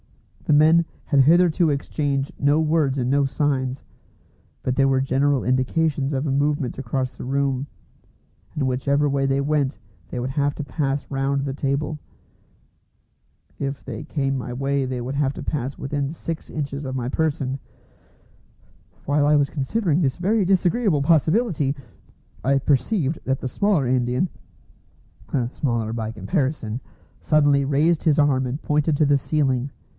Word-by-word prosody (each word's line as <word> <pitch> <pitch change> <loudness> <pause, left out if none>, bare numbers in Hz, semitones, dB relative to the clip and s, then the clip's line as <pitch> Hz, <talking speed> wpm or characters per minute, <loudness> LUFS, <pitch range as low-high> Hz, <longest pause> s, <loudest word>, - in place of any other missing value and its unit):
The 145 - +4
men 160 +3 +6 0.2
had 140 -3 +4
hitherto 170 +2 +4
exchanged 140 -1 -1
no 145 +2 +3
words 155 -3 +1
and 125 -1 0
no 140 +1 +3
signs, 135 -2 -1 0.8
but 130 - 0
there 135 0 +3
were 135 -1 +3
general 135 +1 +1
indications 135 +3 +1
of 140 +1 -1
a - - 0
movement 145 -2 0
across 130 0 -3
the - - -8
room, 135 +1 -1 0.9
and 140 -3 -1
whichever 140 +3 +1
way 140 -1 +1
they 135 0 +1
went 140 -1 0 0.3
they 125 - -4
would 125 +2 -2
have 145 +1 0
to 150 - -4
pass 140 -1 -2
round 135 0 0
the 135 - -2
table. 140 +2 -2 1.6
If 140 0 -4
they 115 -4 -6
came 135 -3 -1
my 125 -1 -5
way 135 +2 -1
they 130 -1 -3
would 125 +3 -4
have 140 -1 +1
to - - -6
pass 135 -2 -3
within 140 0 -2
six 165 0 -6
inches 140 -1 -4
of 130 -1 -4
my 120 -1 -2
person. 140 -2 -1 1.5
While 145 +1 +2
I 150 0 +5
was 140 -1 +2
considering 160 +3 0
this 135 -5 0
very 200 +4 +2
disagreeable 185 - +2
possibility, 160 - +2 0.7
I 135 +3 +3
perceived 145 - +1
that 135 0 -1
the - - -4
smaller 185 -2 +1
Indian 125 +5 +1 1.2
(smaller 115 -6 -1
by 110 -1 -3
comparison) 125 - -2 0.4
suddenly 145 -2 +3
raised 150 +4 +2
his 155 -2 +3
arm 135 -3 +3
and 135 +5 -4
pointed 150 0 +1
to 155 - +3
the 140 -1 +3
ceiling. 135 -3 0
140 Hz, 150 wpm, -23 LUFS, 130-150 Hz, 1.6 s, men